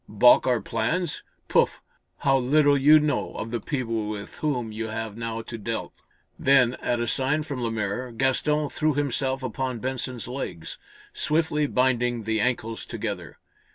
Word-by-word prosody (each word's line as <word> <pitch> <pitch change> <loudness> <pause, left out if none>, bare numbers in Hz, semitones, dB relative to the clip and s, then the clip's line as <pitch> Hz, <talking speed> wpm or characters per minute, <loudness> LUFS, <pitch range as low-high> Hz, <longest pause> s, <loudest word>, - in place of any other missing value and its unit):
Balk 120 +5 +6
our 125 -3 +2
plans? 160 +8 -1 0.3
Pouf? - - +2 0.4
How 135 -1 +4
little 145 +3 +4
you 150 +3 +7
know 150 -3 -1
of 115 - -5
the 120 - -1
people 115 -5 -2
with 105 -1 -7
whom 125 -7 -1
you 110 +1 -4
have 110 -1 -4
now 115 0 -4
to 115 0 -7
dealt." 115 +2 -5 0.4
Then, 130 -3 +5
at 120 -1 0
a 120 - 0
sign 135 +5 0
from 140 -4 -5
Lemaire, 115 +1 -2
Gaston 135 +5 +1
threw 155 -2 0
himself 135 -1 -1
upon 130 +1 -2
Benson's 125 -1 -4
legs, 125 -10 -6 0.3
swiftly 150 -1 +1
binding 125 -3 +1
the 110 0 0
ankles 115 -2 -1
together. 100 -7 -5
125 Hz, 155 wpm, -25 LUFS, 115-140 Hz, 0.4 s, you